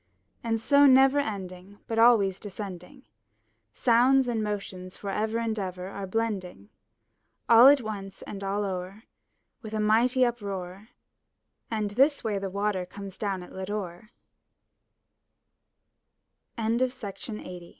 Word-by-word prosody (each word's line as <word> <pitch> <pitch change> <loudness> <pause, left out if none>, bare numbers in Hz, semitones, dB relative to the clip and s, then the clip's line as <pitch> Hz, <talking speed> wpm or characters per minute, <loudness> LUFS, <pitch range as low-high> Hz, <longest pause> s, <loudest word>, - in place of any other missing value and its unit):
And 225 -1 0
so 285 +4 +5
never 270 +1 +6
ending, 195 -5 -6
but 225 0 -2
always 210 -5 +4
descending, 190 -3 -8 0.7
Sounds 245 - +3
and 225 -3 -1
motions 195 -3 -5
forever 215 +3 -2
and 225 -2 -2
ever 185 -1 -5
are 200 0 -6
blending. 190 - -3 0.8
All 235 +2 +8
at 280 -1 +6
once 195 -3 -7
and 200 -1 -8
all 200 +1 -1
o'er, 190 +2 -5 0.6
with 220 -2 -7
a - - -1
mighty 235 +4 +3
uproar, 200 -4 -5 0.8
And 215 -2 -2
this 275 +7 +2
way 210 -3 -1
the 195 0 -4
Water 200 -1 -1
comes 195 +1 -9
down 195 -3 -2
at - - -13
Lodore 190 0 -6 2.5
383 230 - -5
MY 225 +2 +1
BOOK 235 -5 -4
HOUSE 180 -1 -7
TH 170 - -14
210 Hz, 130 wpm, -27 LUFS, 190-230 Hz, 2.5 s, All